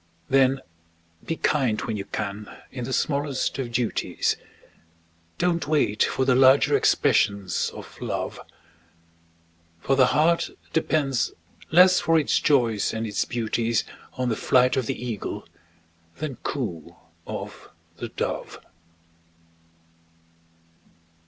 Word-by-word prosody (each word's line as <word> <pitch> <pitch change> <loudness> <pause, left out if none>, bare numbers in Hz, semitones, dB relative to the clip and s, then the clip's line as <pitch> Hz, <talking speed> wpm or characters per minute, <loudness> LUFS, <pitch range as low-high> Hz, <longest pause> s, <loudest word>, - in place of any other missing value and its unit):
Then 135 0 +3 0.7
be 165 - -1
kind 130 -9 +1
when 110 - -3
you 100 -1 -4
can 105 0 -5 0.2
in 125 -2 -5
the 130 - -5
smallest 140 -1 -1
of 125 -3 -3
duties, 115 -1 0 1.0
Don't 170 -3 0
wait 145 -9 +1
for 130 - 0
the 130 - +4
larger 130 +2 +5
expressions 100 -4 +2
of - - -11
Love; - - -3 1.4
For 135 - +1
the 130 -1 +5
heart 165 +3 +2 0.2
depends 145 -5 +1 0.4
less 180 +2 +6
for 165 0 +3
its 155 - +2
joys 115 -8 +2
and 110 0 -2
its 105 -3 -1
beauties 115 -1 0 0.3
On 125 -1 -2
the 115 - 0
flight 125 +2 +3
of 130 -4 -1
the - - -3
Eagle 115 -4 -5 0.7
than 150 -5 -5
coo 100 - -5 0.3
of - - -7 0.3
the - - -5
Dove. - - -4
130 Hz, 115 wpm, -25 LUFS, 110-145 Hz, 1.4 s, less